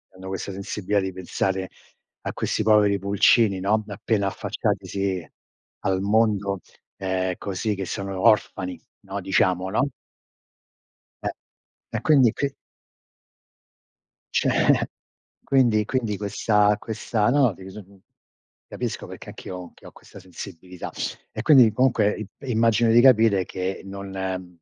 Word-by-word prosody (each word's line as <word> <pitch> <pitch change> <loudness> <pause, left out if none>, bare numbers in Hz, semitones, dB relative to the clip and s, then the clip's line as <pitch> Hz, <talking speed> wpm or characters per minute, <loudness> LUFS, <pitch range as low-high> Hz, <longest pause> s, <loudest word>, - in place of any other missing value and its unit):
hanno 95 0 -10
questa 95 +1 -4
sensibilità 100 +1 -2
di 95 - -2
pensare 95 +1 -2 0.5
a - - -4
questi - - -1
poveri 105 -2 +4
pulcini, 100 +1 +3
no, 105 +3 +1
appena 100 0 -1
affacciatisi 95 -2 -2 0.6
al 95 0 +1
mondo, 100 -2 +1 0.4
ehm, 95 -1 -1
così 100 +2 -2
che 95 -1 -4
sono 100 +1 -4
orfani, 100 -4 +2 0.2
no, 100 +1 -5
diciamo, 95 -1 +1
no? 130 +8 +1 1.4
E - - +3 0.7
e - - -2
quindi 135 -7 +5
qui 140 -1 -2 1.8
Cioè - - +3 0.6
quindi 120 -6 +3
quindi 115 -4 -1
questa 105 +1 +2
questa 110 0 -1
no 130 -5 +4
dis 95 +3 -10 0.9
capisco - - -4
perché - - -10
anch'io 90 - -8
ho 90 -1 -9
che - - -17
ho - - -12
questa 100 - -15
sensibilità 90 -1 -9 0.4
e - - -4
quindi 130 -8 +7
comunque 115 -3 +2
i 110 - -6 0.2
immagino 115 0 +3
di 120 - +7
capire 110 -6 +5
che 95 +1 -4
non 95 -2 -5
100 Hz, 120 wpm, -24 LUFS, 95-110 Hz, 1.8 s, quindi